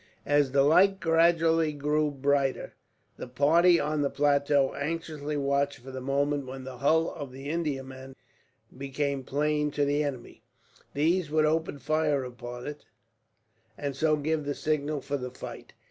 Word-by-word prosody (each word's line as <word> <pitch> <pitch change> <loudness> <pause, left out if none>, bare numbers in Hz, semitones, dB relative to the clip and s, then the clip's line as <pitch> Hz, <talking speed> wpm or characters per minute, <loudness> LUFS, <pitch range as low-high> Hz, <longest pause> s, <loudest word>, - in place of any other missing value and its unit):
As 145 -2 +2
the 135 0 +4
light 190 +6 +4
gradually 165 -1 +3
grew 150 +1 0
brighter, 140 -1 0 0.4
the - - -7
party 165 +7 +4
on 150 0 -1
the 140 - +1
plateau 140 -1 +2
anxiously 150 -1 -4
watched 140 0 0
for 130 +3 -11
the 130 0 -6
moment 140 +1 -1
when 130 0 -7
the 130 -1 -9
hull 160 +4 +2
of 145 -4 -7
the 135 +2 -9
Indiaman 135 -5 -4 0.6
becoming 140 +1 -3
plain 150 +2 0
to 145 0 0
the 145 +1 +1
enemy. 135 -5 -6 0.5
These 160 +3 +1
would 155 0 +2
open 160 -1 0
fire 150 0 0
upon 120 0 -8
it, 150 0 -7 0.9
and 140 -2 -4
so 155 +2 +2
give 155 +1 -1
the 145 0 -3
signal 150 -1 -1
for 140 +1 -3
the 125 -1 -5
fight. 125 - -10
145 Hz, 155 wpm, -28 LUFS, 135-155 Hz, 0.9 s, the